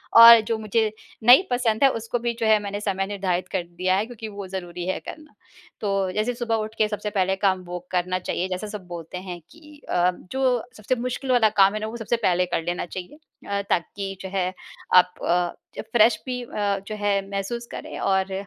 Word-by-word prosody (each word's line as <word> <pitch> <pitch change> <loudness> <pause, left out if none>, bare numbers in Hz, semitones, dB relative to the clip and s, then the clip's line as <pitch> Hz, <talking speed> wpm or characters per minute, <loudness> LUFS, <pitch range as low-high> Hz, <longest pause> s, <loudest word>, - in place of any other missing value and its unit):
और 230 0 +11
जो 225 - 0
मुझे 220 0 +1 0.3
नहीं 245 +10 +8
पसंद 245 -1 +1
है 275 - +8
उसको 230 +1 -3
भी 235 0 -1
जो 230 - 0
है 220 -1 +5
मैंने 200 0 -4
समय 195 -2 -1
निर्धारित 190 -3 -2
कर 190 -3 -1
दिया 180 +2 -1
है 200 +3 +1
क्योंकि 225 -2 -8
वो 200 -1 -7
ज़रूरी 175 -2 -6
है 190 - -1
करना। 305 -1 -10 0.5
तो 195 -3 0
जैसे 215 +6 -1
सुबह 235 -1 -1
उठ 220 0 -3
के 215 - +3
सबसे 210 0 -3
पहले 190 -2 +1
काम 190 -1 +1
वो 175 0 -5
करना 185 0 0
चाहिए 185 0 -2
जैसे 185 +4 -4
सब 205 -3 -7
बोलते 170 0 -7
हैं 180 -1 -7
कि 300 -2 -16
अ, 180 +1 +3 0.2
जो 255 -3 +1
सबसे 215 +4 -1
मुश्किल 255 +2 -3
वाला 235 -4 +5
काम 195 0 +6
है 215 - -2
ना 215 - -3
वो 230 - -6
सबसे 230 +1 -1
पहले 180 0 +3
कर 170 -2 -2
लेना 175 +1 -2
चाहिए। 185 - -8 0.3
अ, 200 0 0
ताकि 195 +2 -2
जो 190 - -6
है 185 -1 0 0.4
आप 180 0 +6
अ, 175 0 +2 0.3
जब - - -4
फ्रेश 225 -1 +5
भी 250 -1 -3
अ 205 -4 -1
जो 215 - -4
है 205 -1 +1
महसूस 200 +4 -3
करें - - -7
और 190 0 +1
205 Hz, 215 wpm, -24 LUFS, 185-230 Hz, 0.5 s, और